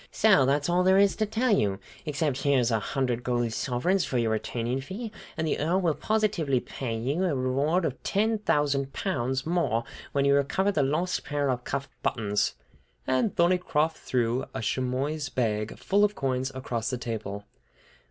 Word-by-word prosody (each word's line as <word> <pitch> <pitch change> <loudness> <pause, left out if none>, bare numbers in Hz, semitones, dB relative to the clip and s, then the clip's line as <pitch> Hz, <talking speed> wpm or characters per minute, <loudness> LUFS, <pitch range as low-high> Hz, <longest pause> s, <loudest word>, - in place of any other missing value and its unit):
"So 195 -12 +4
that's 145 +1 +2
all 175 +1 +3
there 190 +1 +5
is 200 0 +4
to 215 - +1
tell 230 +3 +1
you, 100 - +1 0.3
except 150 -2 0
that 140 - -1
here's 125 -4 +3
a 110 - +2
hundred 125 +1 -1
gold 120 -2 0
sovereigns 170 +12 0
for 130 - -2
your 115 -2 +1
retaining 120 +3 -2
fee, 205 - -6 0.3
and 160 - 0
the 155 - 0
Earl 170 +5 +2
will 170 -4 +2
positively 185 - +1
pay 120 -2 -4
you 140 +10 -1
a 165 -6 +1
reward 140 +7 +1
of 130 - -3
ten 220 +2 +1
thousand 140 -7 +1
pounds 130 -8 -1
more 160 -9 +1 0.3
when 140 -1 +1
you 140 - +4
recover 140 +8 +2
the 155 - +1
lost 155 +7 0
pair 145 -2 0
of 125 -1 -3
cuff 140 - -3
buttons." 105 -3 0 0.5
And 130 +10 +1
Thorneycroft 170 -3 +2
threw 120 0 0
a - - -2
chamois 135 +5 -1
bag, 110 -3 -1
full 200 +1 +2
of 210 0 +2
coins, 130 -1 -1
across 120 -3 -3
the 125 - -2
table. 105 -4 -5
140 Hz, 180 wpm, -27 LUFS, 125-175 Hz, 0.5 s, there